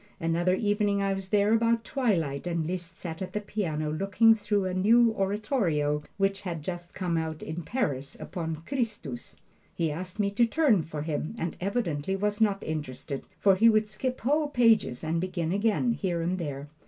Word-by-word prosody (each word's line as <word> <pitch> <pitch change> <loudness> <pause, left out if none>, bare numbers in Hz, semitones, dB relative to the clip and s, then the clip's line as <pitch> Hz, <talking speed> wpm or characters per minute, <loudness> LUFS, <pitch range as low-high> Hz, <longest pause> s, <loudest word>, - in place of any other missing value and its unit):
Another 170 +2 +1
evening 205 0 +1
I 195 0 +1
was 195 -1 -5
there 205 +1 +3
about 230 0 +2
twilight 180 - 0
and 170 -2 -1
Liszt 175 0 -5
sat 165 -1 -6
at 185 - -5
the 210 - 0
piano 160 -8 -2
looking 195 +7 +4
through 205 -2 0
a 185 - -2
new 225 +5 +5
oratorio 195 - 0 0.2
which 195 0 +1
had 170 -5 -5
just 175 +1 -6
come 175 -3 -1
out 160 -1 -3
in 160 +2 -4
Paris, 145 - -2
upon 160 -2 -5
"Christus." 215 - -4 0.4
He 165 -2 0
asked 180 +6 -6
me 200 -1 +1
to 235 +4 +4
turn 245 - +3
for 155 -2 -5
him, 155 +5 -3
and 170 -4 -3
evidently 190 -5 -1
was 205 +2 -1
not 200 -2 +2
interested, 140 -2 -5
for 195 - +5
he 225 +5 +6
would 215 -1 +4
skip 250 +5 -3
whole 295 +5 +2
pages 230 - +3
and 165 +1 0
begin 175 -3 -2
again, 220 +4 +2
here 180 -7 -1
and 180 +2 -1
there. 145 -3 -4
190 Hz, 180 wpm, -28 LUFS, 160-215 Hz, 0.4 s, he